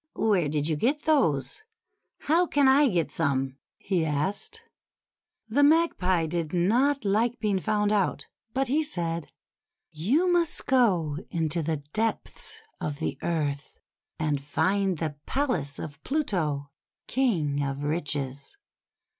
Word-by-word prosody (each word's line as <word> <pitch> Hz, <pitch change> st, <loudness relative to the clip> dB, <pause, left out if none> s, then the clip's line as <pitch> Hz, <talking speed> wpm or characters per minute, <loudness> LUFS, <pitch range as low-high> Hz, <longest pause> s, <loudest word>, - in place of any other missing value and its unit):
"Where 190 Hz, -8 st, +2 dB
did 150 Hz, 0 st, -1 dB
you 160 Hz, -, +1 dB
get 275 Hz, -, 0 dB
those? 220 Hz, -, +1 dB, 0.6 s
How 340 Hz, +4 st, +3 dB
can 285 Hz, -3 st, +3 dB
I 280 Hz, +2 st, +6 dB
get 175 Hz, -5 st, 0 dB
some?" 135 Hz, -3 st, 0 dB, 0.2 s
he 185 Hz, -4 st, 0 dB
asked. 160 Hz, +6 st, -2 dB, 0.8 s
The 240 Hz, +6 st, +2 dB
Magpie 285 Hz, -, +3 dB
did 165 Hz, 0 st, -3 dB
not 240 Hz, +10 st, +2 dB
like 225 Hz, +5 st, +2 dB
being 210 Hz, -4 st, 0 dB
found 210 Hz, +2 st, +1 dB
out; 205 Hz, -3 st, 0 dB, 0.3 s
but 270 Hz, +2 st, 0 dB
he 290 Hz, +6 st, +2 dB
said: 170 Hz, -, -2 dB, 0.4 s
— -, -, -62 dB, 0.2 s
"You 325 Hz, +8 st, +4 dB
must 345 Hz, -3 st, +1 dB
go 185 Hz, -, +2 dB
into 165 Hz, 0 st, 0 dB
the 155 Hz, -2 st, -2 dB
depths 330 Hz, -, -2 dB, 0.2 s
of 145 Hz, -2 st, -3 dB
the 160 Hz, -, -2 dB
earth, 145 Hz, -4 st, -2 dB, 0.4 s
and 150 Hz, -3 st, -1 dB
find 190 Hz, +6 st, +1 dB
the 155 Hz, -2 st, -3 dB
palace 245 Hz, -, -1 dB
of 145 Hz, -1 st, -8 dB
Pluto, 160 Hz, -, -1 dB, 0.3 s
King 165 Hz, -, +1 dB
of 140 Hz, 0 st, -3 dB
Riches. 145 Hz, -, -2 dB
180 Hz, 130 wpm, -27 LUFS, -, 0.8 s, I